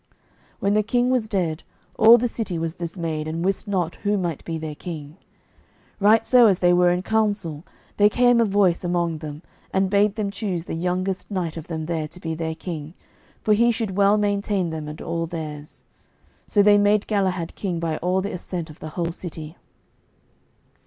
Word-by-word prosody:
When 200 +1 +1
the 215 - +4
king 245 +3 +1
was 240 -4 0
dead, 170 -6 -1 0.3
all 225 +2 +8
the 245 +1 0
city 215 -7 -4
was 165 0 -2
dismayed, 165 -3 -4
and 165 +2 -3
wist 195 +3 -1
not 180 -5 -1
who 205 0 0
might 170 -5 -3
be 165 -1 -4
their 155 -1 -5
king. 150 0 -8 0.8
Right 215 +2 +4
so 245 -2 +6
as 195 -3 +3
they 175 -1 +3
were 180 0 +4
in 180 +1 0
counsel, 205 -8 0 0.3
there 205 0 +6
came 245 +1 +4
a - - +4
voice 195 -4 +2
among 170 -2 -1
them, 150 +1 -8 0.3
and 190 0 +1
bade 205 0 +3
them 210 -3 -2
choose 190 -4 -3
the - - -5
youngest 180 +3 -2
knight 180 -5 -2
of 165 -1 -7
them 160 -2 -4
there 160 -2 -2
to 170 +4 -13
be 165 -2 -4
their 160 0 -3
king, 160 -2 -7 0.5
for 215 - +4
he 235 +3 +4
should 220 -5 -3
well 200 +1 +4
maintain 200 -3 0
them 155 -1 -5
and 150 +1 -7
all 165 0 -2
theirs. 155 -2 -7 0.6
So 205 - +3
they 205 0 +6
made 205 0 +3
Galahad 185 -5 -1
king 180 -4 -3
by 165 -2 -2
all 185 +2 0
the 200 - -4
assent 175 -2 -5
of 155 - -16
the 155 - -7
whole 170 +1 -2
city. 165 -2 -8
180 Hz, 195 wpm, -23 LUFS, 165-205 Hz, 0.8 s, all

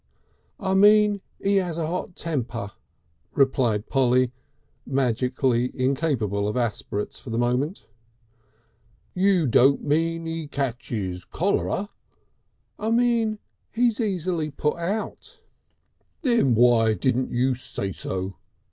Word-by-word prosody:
"I 190 -1 -1
mean 205 +1 +5 0.2
'E 200 0 +4
'As 175 -3 -3
a 165 - -1
'Ot 175 +2 -4
temper," 120 -10 -3 0.6
replied 125 -6 +2
Polly, 130 -2 +2 0.5
magically 125 -1 0
incapable 130 - 0
of 105 - -2
aspirates 105 -3 -3
for - - -10
the 115 - -2
moment. 125 - -1 1.3
"You 185 -2 +3
don't 135 +2 +4
mean 165 +3 0
'E 165 -1 -4
ketches 115 -9 -3
cholera." 200 - -1 0.9
"I 220 - -1
mean 230 -2 +2 0.3
he's 235 0 +1
easily 180 -6 -1
put 150 +2 -1
out." 195 +6 -4 0.8
"Then 235 - +3
why 115 -2 +4
can't 125 +6 0
you 130 +2 +1
say 120 -6 -4
so?" 95 +1 -4
140 Hz, 110 wpm, -24 LUFS, 120-185 Hz, 1.3 s, mean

